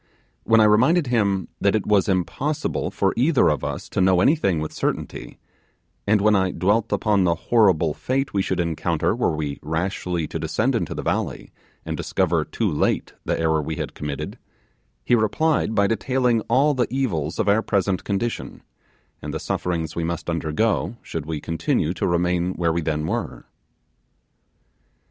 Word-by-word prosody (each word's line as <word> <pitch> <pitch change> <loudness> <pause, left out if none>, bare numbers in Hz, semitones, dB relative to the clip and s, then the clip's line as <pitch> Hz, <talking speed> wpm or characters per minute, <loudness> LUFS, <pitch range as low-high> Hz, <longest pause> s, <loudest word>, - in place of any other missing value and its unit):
When 115 0 +5
I - - +6
reminded 125 +11 +4
him 100 -7 +1
that 100 +1 +2
it 110 - 0
was 105 -1 +2
impossible 140 - -1
for 95 -1 0
either 135 +4 +3
of 75 -4 -1
us - - -4
to - - -1
know 95 -1 +4
anything 100 - +2
with 80 0 -4
certainty, - - -4 0.7
and 105 0 +3
when 105 +1 +4
I 95 -1 +2
dwelt 105 +5 +1
upon 105 -3 +2
the 85 -2 +2
horrible 90 -5 +2
fate 135 - -2
we 100 - +2
should 95 -1 -2
encounter 85 -2 0
were - - 0
we 75 -2 -4
rashly 85 +1 -2
to - - -4
descend - - 0
into - - -2
the - - -4
valley, - - -2 0.3
and - - -3
discover 85 -4 0
too 110 +7 -2
late 75 -6 0
the - - -1
error 80 -1 +2
we 80 +2 -4
had - - -5
committed, 75 -2 -5 0.7
he - - +1
replied 120 +2 +2
by 100 -1 +4
detailing 120 +1 +1
all 145 +3 +4
the 125 -3 0
evils 95 - -2
of - - 0
our 105 +2 +4
present 95 -3 0
condition, 115 +4 -3 0.6
and - - -5
the - - -2
sufferings 85 -3 -2
we 85 - -2
must 85 0 -3
undergo 85 +8 0
should 80 -2 -5
we 80 -2 -3
continue 80 +1 -1
to 85 - -1
remain 90 +1 +1
where 85 -2 +1
we 85 - 0
then 75 -1 -1
were. 115 +6 -4
95 Hz, 170 wpm, -23 LUFS, 80-115 Hz, 0.7 s, I